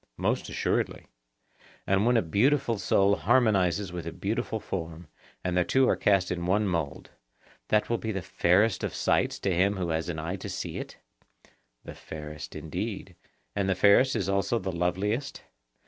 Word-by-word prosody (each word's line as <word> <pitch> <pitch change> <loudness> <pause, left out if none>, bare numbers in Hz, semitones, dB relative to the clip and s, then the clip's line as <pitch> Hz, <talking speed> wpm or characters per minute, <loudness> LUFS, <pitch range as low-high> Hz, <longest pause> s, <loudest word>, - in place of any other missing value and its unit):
Most - - -1
assuredly. - - -1 0.8
And 95 +3 +2
when 120 -1 +4
a 115 - +2
beautiful 115 - +2
soul 100 +1 +3
harmonizes 100 -6 +2
with 85 -2 -5
a - - -3
beautiful 100 +5 -2
form, 85 -4 -6 0.4
and 90 -1 -1
the 90 - +4
two 130 +7 +3
are - - +3
cast 100 -2 +2
in 85 -1 -2
one 105 +3 +2
mould, 85 -6 -3 0.6
that 105 0 +2
will 115 - 0
be 110 - -3
the 95 -3 -4
fairest 95 +3 +2
of - - -3
sights - - +1
to 95 - +1
him 95 +4 +2
who 90 -2 -2
has 80 +1 -1
an 85 - -3
eye 85 +5 -3
to - - -7
see - - -4
it? - - -8 0.9
The - - -8
fairest 75 -1 -8
indeed. 90 +4 -5 0.4
And 100 -1 0
the 95 - +2
fairest 100 +8 +5
is 100 -5 -1
also 100 +4 +1
the 95 -3 -3
loveliest? 95 +10 -2
95 Hz, 175 wpm, -28 LUFS, 85-105 Hz, 0.9 s, fairest